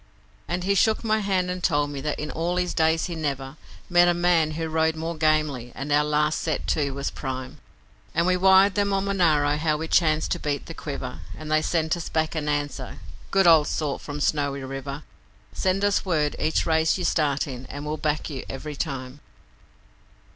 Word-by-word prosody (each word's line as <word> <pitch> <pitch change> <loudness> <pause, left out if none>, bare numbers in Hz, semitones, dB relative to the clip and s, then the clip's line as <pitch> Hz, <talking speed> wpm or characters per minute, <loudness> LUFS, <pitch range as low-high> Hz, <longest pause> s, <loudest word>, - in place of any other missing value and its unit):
And 175 +1 -2
he 200 +2 +2
shook 220 +3 +2
my 220 -1 +2
hand 190 -3 0
and 180 0 -5
told 145 -3 +1
me 140 -1 -5
that 150 +1 -2
in 150 0 -4
all 170 +2 -1
his 180 -1 0
days 160 0 +2
he 175 - -4
never 140 -3 -3 0.3
Met 175 0 +5
a 175 - +3
man 170 -3 +2
who 160 +1 -3
rode 160 0 +1
more 165 +1 -4
gamely, 155 -6 +1
and 140 +2 -5
our 145 +1 +4
last 150 +1 +1
set 155 - -2
to 145 -3 +1
was 140 0 -3
prime, 130 -1 -6 0.6
And 170 - +2
we 180 0 +3
wired 190 +2 +5
them 200 0 +1
on 195 0 0
Monaro 155 -7 +2
how 155 0 +1
we 160 +1 -4
chanced 155 -2 +2
to - - 0
beat 145 -2 -2
the 165 - -7
Quiver. 135 -5 -6 0.2
And 155 0 -7
they 155 0 +4
sent 160 0 0
us 170 - -6
back 160 -1 0
an 150 -2 -2
answer, 145 -1 -3 0.3
'Good 195 -1 +3
old 160 -3 +6
sort 150 -3 -2
from 145 0 -6
Snowy 140 -2 0
River: 135 +2 -6 0.5
Send 190 +2 +1
us 205 0 +2
word 155 -6 0
each 155 +1 +1
race 160 +1 +2
you 180 - -3
start 145 -4 +1
in 130 -2 -8
and 145 +1 -7
we'll 150 +1 -2
back 150 0 -1
you 140 -4 -5
every 150 +2 -6
time.' 135 -2 -4
155 Hz, 205 wpm, -25 LUFS, 145-175 Hz, 0.6 s, old